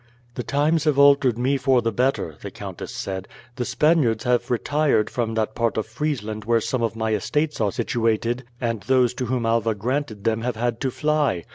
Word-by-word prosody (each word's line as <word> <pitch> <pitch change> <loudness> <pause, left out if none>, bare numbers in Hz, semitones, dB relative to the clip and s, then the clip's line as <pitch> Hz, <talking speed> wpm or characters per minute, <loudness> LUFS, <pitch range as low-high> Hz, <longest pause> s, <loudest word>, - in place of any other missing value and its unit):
"The 125 - -4
times 150 +6 +1
have 150 -3 +2
altered 140 -4 +5
me 130 +3 +1
for 130 -2 +2
the 115 - +1
better," 125 - 0
the - - -6
countess - - -8
said. 95 -1 -5 0.3
"The 125 - -1
Spaniards 140 -9 +2
have 125 -1 +1
retired 140 -1 +1
from 115 -2 -2
that 110 -1 -1
part 115 -1 0
of 110 - 0
Friesland 110 -3 -3
where 115 +2 +2
some 125 +3 -2
of 115 -1 -1
my 110 -1 -1
estates 150 +8 -1
are 105 -2 +2
situated, 115 +3 0 0.2
and 115 -4 -2
those 130 -1 +2
to 125 -1 -3
whom 125 -1 -1
Alva 115 -1 +1
granted 115 -1 -3
them 115 0 +1
have 120 0 -2
had 120 +1 -1
to 135 - +1
fly. 150 - 0
120 Hz, 195 wpm, -23 LUFS, 110-135 Hz, 0.3 s, altered